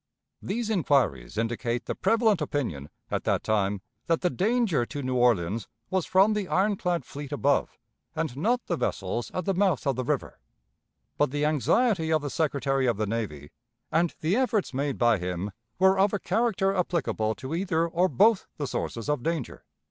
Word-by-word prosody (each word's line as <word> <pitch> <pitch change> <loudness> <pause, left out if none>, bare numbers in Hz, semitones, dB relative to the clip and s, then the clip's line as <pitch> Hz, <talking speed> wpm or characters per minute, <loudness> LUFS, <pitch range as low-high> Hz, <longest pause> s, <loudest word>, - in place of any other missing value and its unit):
These 225 +2 -2
inquiries 135 - +1
indicate 115 +1 -1
the - - -2
prevalent 220 -6 +2
opinion, 115 - -3 0.2
at - - -1
that - - +1
time, 100 -2 0 0.3
that 165 -1 +1
the 180 - +1
danger 210 - +1
to 145 +4 -5
New 130 0 -1
Orleans 115 -4 +2 0.2
was 185 -2 0
from 195 +3 +4
the 210 -3 -2
ironclad 185 -3 0
fleet 145 0 -8
above, 145 -1 +1 0.4
and 155 -5 -2
not 235 - 0
the 175 - -1
vessels 105 0 -2
at 180 - -3
the 195 - +1
mouth 185 -5 +1
of 135 -2 +1
the 130 - -2
river; - - -2 0.8
but 145 - +3
the 145 +2 -1
anxiety 160 - +2
of 155 -2 +2
the 145 - -3
Secretary 135 -3 0
of 115 -4 +1
the 110 - 0
Navy 100 -10 -4 0.4
and 165 +1 +1
the 165 +5 +1
efforts 245 - +1
made 140 0 -1
by 120 -4 +3
him 90 +3 -3 0.3
were 190 +1 +4
of 195 +1 +3
a 205 - 0
character 195 -1 +1
applicable 125 - 0
to 130 +4 -6
either 170 -2 0
or 175 +2 +2
both 205 - +3
the 145 - -2
sources 115 -2 -4
of 150 -3 0
danger. 160 -3 -3
150 Hz, 180 wpm, -27 LUFS, 120-190 Hz, 0.8 s, from